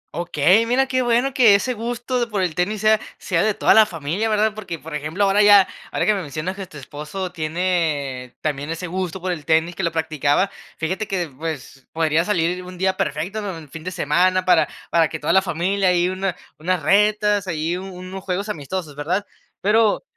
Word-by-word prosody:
Okey, 175 Hz, +6 st, +3 dB
mira 255 Hz, +3 st, +3 dB
qué 260 Hz, -1 st, 0 dB
bueno 245 Hz, +2 st, +1 dB
que 235 Hz, -6 st, +6 dB
ese 250 Hz, +6 st, 0 dB
gusto 240 Hz, +2 st, -3 dB
de 240 Hz, -, 0 dB
por 205 Hz, -4 st, -1 dB
el 175 Hz, -3 st, -1 dB
tenis 195 Hz, +5 st, -1 dB
sea, 215 Hz, 0 st, +4 dB, 0.2 s
sea 175 Hz, -3 st, 0 dB
de 215 Hz, -1 st, +1 dB
toda -, -, +4 dB
la 220 Hz, -1 st, +7 dB
familia, 170 Hz, +6 st, -2 dB
¿verdad? 215 Hz, 0 st, +2 dB
Porque, 195 Hz, -6 st, -6 dB
por 160 Hz, +1 st, -10 dB
ejemplo, 155 Hz, +6 st, -2 dB
ahora 200 Hz, +1 st, +4 dB
ya 205 Hz, -2 st, +7 dB, 0.2 s
ahora -, -, 0 dB
que 215 Hz, -, +4 dB
me 200 Hz, -, -2 dB
mencionas 155 Hz, +4 st, -4 dB
que 195 Hz, -1 st, -7 dB
tu 155 Hz, -, -12 dB
esposo 150 Hz, +7 st, -6 dB
tiene 155 Hz, -6 st, -2 dB
también 145 Hz, -1 st, -2 dB
ese 165 Hz, +2 st, -4 dB
gusto 185 Hz, +1 st, -3 dB
por 185 Hz, +1 st, -2 dB
el 165 Hz, -4 st, -4 dB
tenis, 160 Hz, +2 st, +2 dB
que -, -, -4 dB
lo 170 Hz, -2 st, 0 dB
practicaba, 160 Hz, +3 st, +1 dB, 0.3 s
fíjate 185 Hz, +6 st, -2 dB
que, 180 Hz, -6 st, -2 dB
pues, 145 Hz, -3 st, -7 dB
podría 160 Hz, 0 st, +2 dB
salir 180 Hz, -2 st, 0 dB
un 180 Hz, 0 st, -10 dB
día 190 Hz, +1 st, +1 dB
perfecto 165 Hz, +8 st, -2 dB
¿no? 195 Hz, -4 st, -5 dB
Un 155 Hz, -3 st, -12 dB
fin 160 Hz, +2 st, -9 dB
de 180 Hz, -, -3 dB
semana 185 Hz, +1 st, +1 dB
para 185 Hz, -, +4 dB, 0.2 s
para 165 Hz, -1 st, +4 dB
que 160 Hz, -, -4 dB
toda 150 Hz, -, 0 dB
la 190 Hz, -, +6 dB
familia 190 Hz, +2 st, 0 dB
ahí 175 Hz, 0 st, +3 dB
una 185 Hz, -1 st, -2 dB, 0.2 s
unas 175 Hz, +1 st, -1 dB
retas 210 Hz, +2 st, +3 dB
ahí 165 Hz, 0 st, -1 dB
u -, -, -7 dB
unos 185 Hz, 0 st, -8 dB
juegos 195 Hz, +2 st, -2 dB
amistosos, 155 Hz, -2 st, -5 dB
¿verdad? 175 Hz, +8 st, -1 dB, 0.4 s
Pero, 215 Hz, +1 st, +3 dB
185 Hz, 210 wpm, -21 LUFS, 160-205 Hz, 0.4 s, la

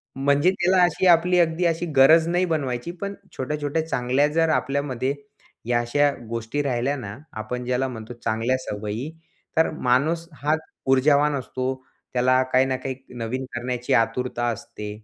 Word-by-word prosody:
म्हणजे 140 Hz, +5 st, +3 dB
त्याला 185 Hz, 0 st, +2 dB
अशी 175 Hz, +1 st, +1 dB
आपली 180 Hz, +1 st, +5 dB
अगदी 170 Hz, +1 st, +2 dB
अशी 170 Hz, 0 st, +1 dB
गरज 160 Hz, +5 st, +6 dB
नाही 175 Hz, +2 st, +2 dB
बनवायची. 140 Hz, -4 st, -2 dB
पण 200 Hz, +3 st, -5 dB, 0.2 s
छोट्या-छोट्या 150 Hz, +3 st, -2 dB
चांगल्या 130 Hz, +1 st, +1 dB
जर 165 Hz, +2 st, +1 dB
आपल्यामध्ये 135 Hz, -2 st, 0 dB, 0.5 s
या 120 Hz, 0 st, +2 dB
अशा 145 Hz, +5 st, +2 dB, 0.2 s
गोष्टी 115 Hz, +5 st, -2 dB
राहिल्या 130 Hz, +1 st, 0 dB
ना, 105 Hz, -5 st, -7 dB, 0.2 s
आपण 125 Hz, +3 st, -4 dB
ज्याला 125 Hz, +1 st, 0 dB
म्हणतो 115 Hz, -2 st, -7 dB
चांगल्या 120 Hz, +2 st, -1 dB
सवयी, 105 Hz, +3 st, -4 dB, 0.5 s
तर 160 Hz, -, +4 dB
माणूस 155 Hz, +5 st, +1 dB
हाच 155 Hz, +2 st, +1 dB, 0.3 s
ऊर्जावान 145 Hz, +2 st, +4 dB
असतो. 130 Hz, -1 st, -3 dB, 0.4 s
त्याला 130 Hz, +1 st, +3 dB
काही 130 Hz, +1 st, +5 dB
ना 130 Hz, -1 st, -1 dB
काही 130 Hz, 0 st, -4 dB, 0.2 s
नवीन 125 Hz, +3 st, -3 dB
करण्याची 120 Hz, 0 st, -2 dB
आतुरता 120 Hz, +1 st, +1 dB
असते. 105 Hz, -1 st, -6 dB
135 Hz, 150 wpm, -24 LUFS, 125-155 Hz, 0.5 s, गरज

